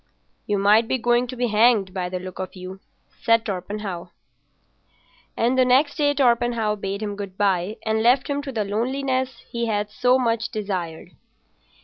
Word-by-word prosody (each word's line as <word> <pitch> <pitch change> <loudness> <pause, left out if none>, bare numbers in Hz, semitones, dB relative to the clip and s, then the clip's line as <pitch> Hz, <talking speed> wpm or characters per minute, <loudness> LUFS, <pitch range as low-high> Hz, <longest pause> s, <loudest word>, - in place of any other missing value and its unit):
"You 205 - +1
might 210 +3 +4
be 260 - +1
going 240 +1 +2
to 255 - -6
be 245 -1 -1
hanged 215 -3 +3
by 180 -2 -3
the 185 - -3
look 185 0 -9
of 185 0 -5
you," 185 +1 -8 0.4
said 230 0 +3
Torpenhow. 190 -2 -5 1.3
And 245 +3 +2
the - - +7
next 260 +4 +3
day 290 -2 +3
Torpenhow 235 -4 +2
bade 200 +1 -4
him 205 -1 -3
good 200 -2 -7
bye 195 0 0
and 220 0 +1
left 250 +3 +3
him 285 0 -1
to 280 -1 -6
the 220 -4 -1
loneliness 255 +3 -2
he 235 0 -2
had 210 -1 -1
so 250 +3 +3
much 230 -3 0
desired. 185 -7 -4
220 Hz, 170 wpm, -23 LUFS, 200-245 Hz, 1.3 s, the